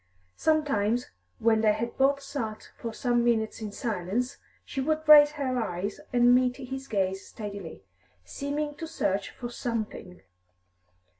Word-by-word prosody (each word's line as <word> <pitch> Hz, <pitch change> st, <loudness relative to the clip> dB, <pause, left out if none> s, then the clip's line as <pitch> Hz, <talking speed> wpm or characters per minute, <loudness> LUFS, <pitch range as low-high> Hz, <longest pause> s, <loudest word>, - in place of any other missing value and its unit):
Sometimes, 245 Hz, -8 st, +1 dB, 0.3 s
when 220 Hz, -1 st, +3 dB
they 215 Hz, -1 st, +4 dB
had 235 Hz, +2 st, -3 dB
both 275 Hz, +1 st, +2 dB
sat 225 Hz, -7 st, -5 dB
for 230 Hz, -, -5 dB
some 240 Hz, +1 st, +1 dB
minutes 225 Hz, -2 st, +1 dB
in 215 Hz, -2 st, -4 dB
silence, 220 Hz, +3 st, -2 dB, 0.3 s
she 270 Hz, -, -3 dB
would 310 Hz, +2 st, -1 dB
raise 295 Hz, -1 st, +9 dB
her 260 Hz, -4 st, -1 dB
eyes 200 Hz, -2 st, -3 dB
and 245 Hz, 0 st, +5 dB
meet 250 Hz, 0 st, +3 dB
his 265 Hz, 0 st, -6 dB
gaze 190 Hz, -2 st, -1 dB
steadily, 200 Hz, -, -7 dB, 0.4 s
seeming 295 Hz, -, -3 dB
to 325 Hz, -, -5 dB
search 200 Hz, -11 st, -1 dB
for 240 Hz, -, -7 dB
something. 215 Hz, -7 st, -4 dB
240 Hz, 140 wpm, -28 LUFS, 210-275 Hz, 0.4 s, raise